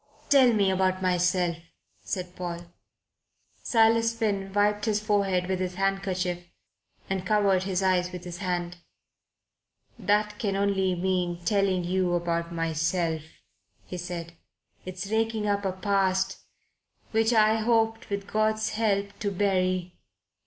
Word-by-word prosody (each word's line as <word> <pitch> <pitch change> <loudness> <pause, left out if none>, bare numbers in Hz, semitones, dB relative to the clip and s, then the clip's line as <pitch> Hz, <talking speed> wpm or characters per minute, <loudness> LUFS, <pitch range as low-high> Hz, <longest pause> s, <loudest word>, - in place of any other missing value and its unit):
"Tell 265 -3 +7
me 200 -4 +2
about 185 0 +1
myself," 180 -1 +1 0.4
said 180 -1 -5
Paul. 175 -1 -5 1.0
Silas 230 0 +3
Finn 200 -4 -1
wiped 205 +1 +1
his 215 -2 +1
forehead 200 -4 +1
with 190 -1 -1
his 185 -1 -3
handkerchief 190 -2 -1 0.7
and 190 -1 -2
covered 195 -2 +2
his 190 -1 -1
eyes 180 -1 +2
with 180 -1 -7
his 175 0 -7
hand. 175 -2 -2 1.2
"That 210 +1 +1
can 200 -3 -1
only 195 -2 +1
mean 175 -1 -1
telling 195 -1 +2
you 180 0 0
about 170 -1 -1
myself," 165 0 -1 0.6
he 180 - -6
said. 170 -1 -6 0.5
"It's 185 +1 -5
raking 220 -1 0
up 200 0 0
a 190 - +1
past 190 0 0 0.7
which 225 +1 +2
I 220 -1 +4
had 220 - -3
hoped, 225 -1 +1
with 200 -1 -3
God's 215 +1 0
help, 200 -2 -1
to 205 - -1
bury. 185 -2 0
190 Hz, 130 wpm, -27 LUFS, 180-210 Hz, 1.2 s, Tell